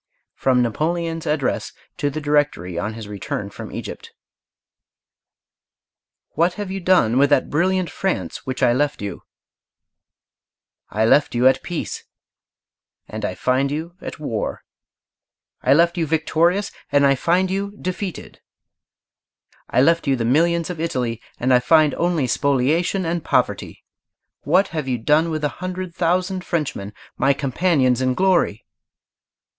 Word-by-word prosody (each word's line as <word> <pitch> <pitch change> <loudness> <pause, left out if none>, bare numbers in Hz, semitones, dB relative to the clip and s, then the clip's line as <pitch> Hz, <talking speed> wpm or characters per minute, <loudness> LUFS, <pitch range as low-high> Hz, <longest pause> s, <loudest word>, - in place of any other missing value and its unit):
FROM 125 -2 +2
NAPOLEON'S 165 +6 -2
ADDRESS 150 -3 -1 0.2
TO 145 - -1
THE 150 +2 -4
DIRECTORY 145 - 0
ON 105 +2 -3
HIS 110 -2 -8
RETURN 100 -2 -5
FROM - - -9
EGYPT - - -7 2.2
What 170 +3 +1
have 205 -2 -5
you 195 - -3
done 170 -10 +3
with 140 0 +4
that 145 - +2
brilliant 185 +3 +1
France 95 - -3
which 130 0 -3
I 120 -1 +5
left 145 -3 0
you? 100 - -5 1.7
I 110 +2 +1
left 145 +3 +3
you 120 +1 +2
at 130 - +3
peace, 175 -2 -5 1.0
and - - -7
I - - -2
find 130 +2 +1
you 160 +4 -4
at - - -7
war. 115 -8 -3 1.0
I 135 - +4
left 170 +2 +3
you 165 - 0
victorious 165 +5 +1 0.2
and 140 0 +4
I 140 - +5
find 180 +7 +1
you 200 +1 -3
defeated. 185 0 -5 1.3
I 125 - +3
left 165 0 +2
you 135 - +3
the 120 -2 -2
millions 170 +7 +2
of 170 - -7
Italy, 125 -8 -2 0.2
and 130 +1 +2
I 125 - +6
find 150 +3 +4
only 170 -5 0
spoliation 140 +8 +1
and 165 -1 -2
poverty. - - -1 0.6
What 185 +7 +3
have 155 -5 -4
you 125 -2 0
done 150 +8 +2
with 155 -1 -3
the 150 - +2
hundred 185 -1 -4
thousand 180 +2 0
Frenchmen, 145 - -3 0.3
my 135 +2 +3
companions 135 -2 +1
in 130 -1 +1
glory? 185 - +1
150 Hz, 140 wpm, -21 LUFS, 130-175 Hz, 2.2 s, I